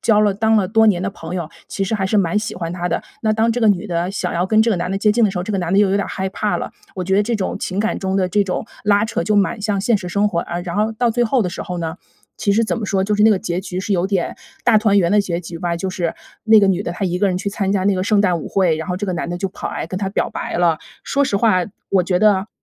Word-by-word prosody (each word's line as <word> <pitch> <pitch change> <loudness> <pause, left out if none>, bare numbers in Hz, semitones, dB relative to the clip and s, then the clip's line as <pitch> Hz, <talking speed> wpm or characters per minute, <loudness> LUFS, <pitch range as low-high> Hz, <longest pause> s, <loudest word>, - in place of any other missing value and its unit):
交 210 -2 +3
了 210 -1 +3
当 220 +3 +1
了 195 -4 +2
多 220 +1 +4
年 185 -4 +3
的 195 - -1
朋 165 -2 -8
友， 170 -3 -4 0.2
其 195 - -4
实 195 +3 -2
还 190 -2 -1
是 215 - +1
蛮 195 0 +2
喜 210 - -4
欢 170 -2 -4
他 175 0 -3
的。 - - -1 0.2
那 215 -1 +1
当 225 +1 +2
这 240 +2 -1
个 225 - +3
女 205 +1 +1
的 170 0 -1
想 - - -2
要 175 +2 0
跟 215 +2 +4
这 230 - +1
个 205 - +1
男 175 +1 -2
的 195 - -1
接 210 +1 +3
近 230 +1 +3
的 200 - +3
时 190 - -7
候， 180 - -1
这 200 - -5
个 200 - 0
男 175 -1 -2
的 195 - +4
又 200 - +3
有 195 - +2
点 200 - -1
害 190 0 -3
怕 210 +2 -1
了， - - -4 0.2
我 185 - -3
觉 190 +2 +1
得 205 - +4
这 235 - -1
种 195 -4 -2
情 190 +2 -2
感 220 - -1
中 190 0 -2
的 185 -2 +1
这 205 +2 +2
种 185 - -3 0.2
拉 205 +1 +3
扯 220 -6 -2
就 210 - +1
蛮 205 +2 +1
像 200 -2 0
现 220 0 +2
实 180 - -6
生 200 +3 +1
活 175 - -2
啊。 175 +1 -3
然 175 0 -5
后 215 +2 +1
到 235 +1 +1
最 240 +1 +1
后 240 +1 +2
的 180 - -1
时 - - -5
候 180 -2 -5
呢， 165 0 -4 0.4
其 200 - +1
实 225 +3 +3
怎 220 - -2
么 225 - -3
说， 195 -1 0
就 210 +2 0
是 210 - +2
那 220 - +7
个 200 - +3
结 180 -2 -3
局 185 -2 -4
是 200 +1 -2
有 180 +1 +1
点 195 -3 -1 0.3
大 235 -2 +5
团 210 -2 +4
圆 175 -2 +2
的 210 - +4
结 175 -3 -3
局 170 -1 -8
吧， 170 0 -1
就 190 +3 -3
是 180 -3 -2 0.3
那 220 -1 +6
个 200 - +4
女 190 0 +1
的 - - -4
她 195 +2 -3
一 180 - -1
个 205 - +2
人 180 -1 -1
去 200 - -2
参 195 -1 -1
加 190 -2 0
那 200 0 +3
个 185 - -1
圣 210 -1 +3
诞 180 -4 +2
舞 155 - -7
会， 180 -5 +2
然 160 0 -5
后 180 - -1
这 205 - -3
个 185 - -1
男 170 0 -3
的 175 - -3
就 195 +1 -2
跑 - - -6
来 - - -4
跟 185 - -5
她 195 0 -2
表 - - 0
白 - - -4
了。 170 -3 +3 0.3
说 280 0 +1
实 205 -7 0
话， 200 -5 +3 0.3
我 190 -2 +3
觉 180 0 0
得 210 -1 +3
195 Hz, 360 characters per minute, -19 LUFS, 180-210 Hz, 0.4 s, 那